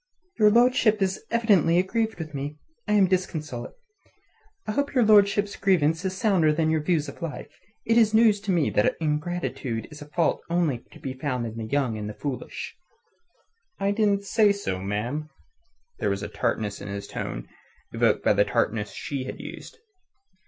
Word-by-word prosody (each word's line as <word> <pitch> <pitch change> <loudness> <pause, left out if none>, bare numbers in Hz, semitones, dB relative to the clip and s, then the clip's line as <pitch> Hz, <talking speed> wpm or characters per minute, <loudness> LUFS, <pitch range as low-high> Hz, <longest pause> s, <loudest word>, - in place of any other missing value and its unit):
"Your 210 -1 +7
lordship 230 -1 +4
is 190 -1 -1
evidently 205 -8 +3
aggrieved 220 +4 0
with 155 -2 -7
me. 145 +2 -5 0.3
I 210 - +1
am 205 -2 +6
disconsolate. 160 -9 -3 0.9
I - - -2
hope 285 +5 -1
your 245 -3 +4
lordship's 205 -1 +4
grievance 165 -3 +2
is 190 0 -2
sounder 190 -8 +3
than 160 +1 +1
your 160 -1 +1
views 155 -1 0
of 140 - -10
life. 165 -3 -6 0.3
It 230 +1 +4
is 220 -2 +4
news 220 -2 +5
to 200 - -2
me 170 -6 +2
that 105 - +2
ingratitude 150 -7 -2
is 150 0 -11
a 145 - -9
fault 165 +2 0
only 170 -7 +1
to - - -13
be 130 - -5
found 130 -2 -2
in 110 -1 -6
the 115 -1 -5
young 125 -4 0
and 105 0 -4
the 105 - -8
foolish." 140 -4 -5 1.0
"I 200 0 +1
didn't 205 -1 +1
say 210 +1 +3
so, 200 - -3
ma'am." 120 +10 -3 0.7
There - - 0
was 100 0 -2
a - - -3
tartness 105 -2 -2
in - - -7
his 100 0 -5
tone - - -5 0.5
evoked - - +2
by - - +5
the 100 0 +4
tartness 105 -1 -1
she 135 -3 -4
had - - -7
used. - - -9
165 Hz, 180 wpm, -25 LUFS, 130-200 Hz, 1.0 s, Your